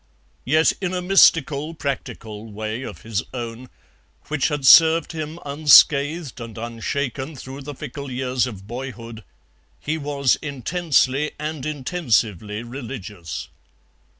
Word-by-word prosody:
Yet 155 +5 +4
in 185 -1 -1
a 180 - -1
mystical 165 -5 +4
practical 115 -7 -5
way 110 +3 -4
of 135 - -8
his 110 -2 -2
own, 120 +1 -6 0.6
which 150 -3 +1
had 145 -3 -2
served 165 +4 +7
him 155 0 -5
unscathed 145 0 +4
and 115 -2 -8
unshaken 130 +5 -4
through 130 +1 -9
the 145 +1 -7
fickle 140 +2 -7
years 130 0 -1
of 100 -5 -9
boyhood, 115 -1 -7 0.6
he 160 +2 -3
was 140 -2 +1
intensely 145 0 0
and 150 -2 -4
intensively 115 - -1
religious. 115 - -7
135 Hz, 120 wpm, -22 LUFS, 115-150 Hz, 0.6 s, served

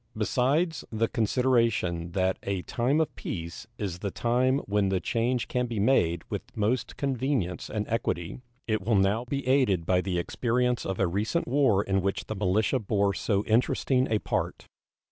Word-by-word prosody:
Besides 140 - +1
the 115 0 +1
consideration 115 -8 +1
that 95 0 +1
a 95 -2 -3
time 130 +6 0
of 160 - -1
peace 85 -1 -6
is 90 -4 -4
the 100 - -2
time 125 +6 +1
when 100 -1 +1
the 95 -1 +1
change 120 +5 0
can 125 0 -1
be 115 -3 -3
made 85 -8 +2
with - - -3 0.2
most 110 +4 -1
convenience 130 -8 -1
and 105 -1 -3
equity, 95 -5 -2 0.3
it 110 -2 0
will 110 +3 +1
now 100 +5 +2
be 135 +1 -3
aided 125 -11 +3
by 90 +1 +2
the 90 -2 -2
experience 125 +7 0
of 95 - -3
a 95 - +3
recent 105 - -1
war 120 -6 +3
in 95 -1 0
which 100 +1 -2
the 110 - -5
militia 105 +6 +1
bore 100 -2 +1
so 100 -1 0
interesting 125 +3 +2
a 110 - +3
part. - - -3
110 Hz, 170 wpm, -27 LUFS, 95-125 Hz, 0.3 s, aided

